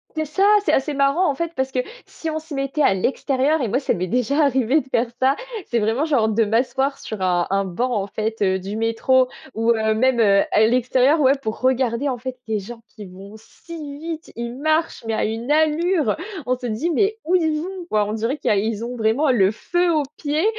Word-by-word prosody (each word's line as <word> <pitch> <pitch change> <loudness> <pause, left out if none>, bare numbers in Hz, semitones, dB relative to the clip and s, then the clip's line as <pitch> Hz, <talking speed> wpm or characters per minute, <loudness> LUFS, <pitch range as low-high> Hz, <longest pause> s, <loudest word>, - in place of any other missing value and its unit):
C'est 315 0 -1
ça, 310 +6 -1 0.2
c'est - - +2
assez 290 +3 +1
marrant 280 +6 +2
en - - -5
fait 335 +3 -3
parce 265 0 -2
que, 255 - -1 0.3
si 325 - -6
on 315 - -2
se 315 0 -11
mettait 275 +2 -2
à 270 - +4
l'extérieur, 270 +8 0
et 240 - -1
moi 245 +6 +1
ça 275 - 0
m'est 180 +1 -3
déjà 250 - +1
arrivé 265 +1 +2
de 255 - -18
faire 235 +1 +1
ça. 265 +2 +3 0.3
C'est 235 - 0
vraiment 225 +6 0
genre 275 -9 +2
de 220 +1 +2
m'asseoir 255 +5 0
sur 215 -3 -7
un 175 -2 +1
un 195 +1 +1
banc 235 +7 -2
en 200 -3 -1
fait, 220 +2 -4
heu, 190 -1 +2
du 195 +3 -6
métro. 230 +3 +2 0.2
Ou, 225 +1 +1
heu, 220 -1 +1
même, 250 +2 +2
heu, 200 -3 +5
à 215 - +4
l'extérieur. 255 +5 +3
Ouais 265 -1 +5
pour 220 -4 -5
regarder 255 +1 +1
en 255 - -2
fait 255 +1 -6
des 220 -1 -1
gens 230 +4 -10
qui 210 - -11
vont 195 +3 -12
si 290 +5 -10
vite, 325 0 -7
ils 235 0 -5
marchent 310 -2 0
mais 225 - -1
à - - 0
une 225 +4 -3
allure. 315 +2 +2 0.3
On 250 +1 0
se 250 - -8
dit 240 +9 -2
mais 405 +5 +1
où 350 +3 +1
ils 315 -3 +1
vont 370 +1 -6
quoi? 210 -1 +2
On 205 - -4
dirait 230 +6 -2
qui - - -2
a 210 - +3
ils 220 +2 -1
ont 245 +1 -5
vraiment 235 +6 +2
le 195 -6 +4
feu 350 +9 0
aux 300 - +2
pieds, 300 +4 -1
255 Hz, 235 wpm, -21 LUFS, 220-300 Hz, 0.3 s, heu